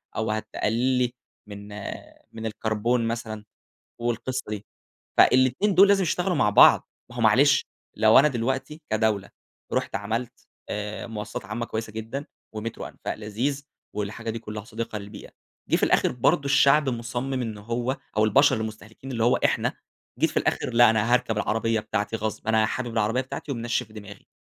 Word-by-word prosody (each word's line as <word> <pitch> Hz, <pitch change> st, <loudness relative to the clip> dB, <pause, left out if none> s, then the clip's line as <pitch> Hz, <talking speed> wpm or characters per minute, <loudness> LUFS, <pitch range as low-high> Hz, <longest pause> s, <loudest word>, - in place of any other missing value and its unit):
أو 110 Hz, 0 st, -1 dB
هتقلّل 115 Hz, +4 st, 0 dB
لي 125 Hz, -1 st, +1 dB, 0.3 s
من 100 Hz, 0 st, -9 dB, 0.7 s
من 110 Hz, 0 st, -7 dB
الكربون 110 Hz, +2 st, 0 dB
مثلًا 110 Hz, -2 st, -4 dB, 0.5 s
والقصة 120 Hz, +2 st, -2 dB
دي. 105 Hz, -1 st, -5 dB, 0.5 s
فالاتنين 130 Hz, -, +4 dB
دول 195 Hz, +3 st, +7 dB
لازم 200 Hz, -1 st, +4 dB
يشتغلوا 180 Hz, +2 st, 0 dB
مع 105 Hz, -, +3 dB
بعض. 105 Hz, -, +7 dB, 0.2 s
ما -, -, -11 dB
هو -, -, -3 dB
معلش -, -, +5 dB, 0.3 s
لو 110 Hz, 0 st, +6 dB
أنا 150 Hz, +3 st, +6 dB
دلوقتي 135 Hz, +4 st, -2 dB
كدولة 110 Hz, -2 st, 0 dB, 0.4 s
رُحت -, -, -1 dB
عملت 115 Hz, +4 st, -4 dB, 0.2 s
آآ، 105 Hz, +2 st, -4 dB
مواصلات 105 Hz, -2 st, -6 dB
عامة 120 Hz, 0 st, -4 dB
كويسة 110 Hz, -1 st, -4 dB
جدًا، 115 Hz, +6 st, -5 dB, 0.3 s
ومترو 110 Hz, +1 st, -5 dB
أنفاق -, -, -6 dB
لذيذ 120 Hz, +7 st, -3 dB, 0.3 s
والحاجة 105 Hz, +2 st, -4 dB
دي 115 Hz, -, -4 dB
كلها 105 Hz, -2 st, -7 dB
صديقة 115 Hz, -2 st, -5 dB
للبيئة، 100 Hz, +1 st, -10 dB, 0.4 s
جه -, -, +3 dB
في -, -, -4 dB
الآخر -, -, +3 dB
برضه 125 Hz, +3 st, +2 dB
الشعب 140 Hz, +1 st, +4 dB
مُصمِم 120 Hz, +2 st, -3 dB
إنه 110 Hz, -3 st, -5 dB
هو 120 Hz, +4 st, -2 dB, 0.2 s
أو 110 Hz, -, +4 dB
البشر 135 Hz, +4 st, +4 dB
المُستهلكين 110 Hz, +3 st, -7 dB
اللي 115 Hz, -1 st, 0 dB
هو 120 Hz, -, +4 dB
إحنا، -, -, +2 dB, 0.5 s
جيت -, -, +2 dB
في -, -, -14 dB
الآخر -, -, 0 dB
لأ 120 Hz, 0 st, +7 dB
أنا 115 Hz, +2 st, +1 dB
هاركب 125 Hz, -3 st, +1 dB
العربية 115 Hz, +1 st, 0 dB
بتاعتي 110 Hz, 0 st, -2 dB
غصب، 110 Hz, 0 st, -4 dB
أنا 110 Hz, -1 st, +4 dB
حابب 120 Hz, +1 st, -3 dB
العربية 115 Hz, +3 st, +1 dB
بتاعتي 130 Hz, +2 st, -5 dB
ومنشِّف 120 Hz, -2 st, -2 dB
دماغي، 100 Hz, -2 st, -11 dB
115 Hz, 160 wpm, -25 LUFS, 110-125 Hz, 0.7 s, دول